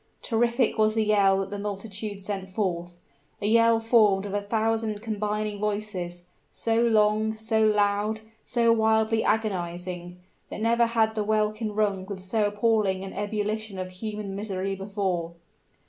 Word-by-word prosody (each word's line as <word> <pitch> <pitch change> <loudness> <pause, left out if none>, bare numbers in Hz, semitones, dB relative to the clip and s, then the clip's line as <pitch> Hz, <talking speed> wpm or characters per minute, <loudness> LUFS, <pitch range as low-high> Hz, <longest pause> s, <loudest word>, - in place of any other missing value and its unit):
Terrific 235 0 +1
was 215 0 +3
the 220 -1 +2
yell 200 -2 +4
that 195 - -5
the 205 - -4
multitude 205 0 -5
sent 190 -1 -4
forth 175 -3 -2 0.4
a 205 - -3
yell 230 +1 +5
formed 215 -4 +4
of 200 - -5
a 205 - 0
thousand 220 0 -1
combining 210 -1 -2
voices, 205 -4 -3 0.3
so 225 0 0
long, 220 -1 +2
so 220 0 +1
loud, 210 0 +2 0.2
so 235 -1 +3
wildly 220 0 +2
agonizing, 180 -4 -2 0.3
that - - -6
never 235 +1 +3
had 225 -1 +2
the 215 -1 -1
welkin 215 0 0
rung 200 -3 0
with 195 -2 -7
so 210 +3 +1
appalling 205 -2 +1
an 195 - -7
ebullition 210 0 -3
of 185 0 -5
human 210 +1 -5
misery 195 -1 -3
before! 195 -4 -2
210 Hz, 145 wpm, -26 LUFS, 195-220 Hz, 0.4 s, yell